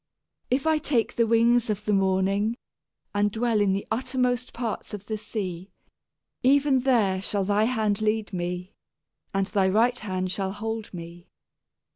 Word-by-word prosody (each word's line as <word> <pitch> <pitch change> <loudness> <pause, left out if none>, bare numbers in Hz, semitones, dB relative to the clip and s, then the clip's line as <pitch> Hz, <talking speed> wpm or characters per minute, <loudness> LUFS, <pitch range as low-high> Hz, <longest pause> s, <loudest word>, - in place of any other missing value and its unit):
If 260 +3 +1
I 315 -1 +3
take 260 -6 0
the 230 -1 +2
wings 235 +1 +3
of 210 0 -2
the 210 - +1
morning, 195 +3 +1 0.6
and 205 0 +2
dwell 225 -1 +1
in 200 -2 +3
the 195 +1 -1
uttermost 250 +1 0
parts 230 -3 -4
of 200 -1 -10
the 220 - -3
sea; 190 -4 -5 0.7
Even 275 +1 +4
there 225 -8 +2
shall 200 0 -1
thy 205 +2 +2
hand 220 -4 0
lead 215 -1 0
me, 180 +1 -4 0.6
and 195 0 +1
thy 195 -2 +1
right 235 +5 +3
hand 185 -3 -3
shall 190 0 -2
hold 220 +1 -4
me. 175 0 -9
215 Hz, 155 wpm, -26 LUFS, 195-235 Hz, 0.7 s, Even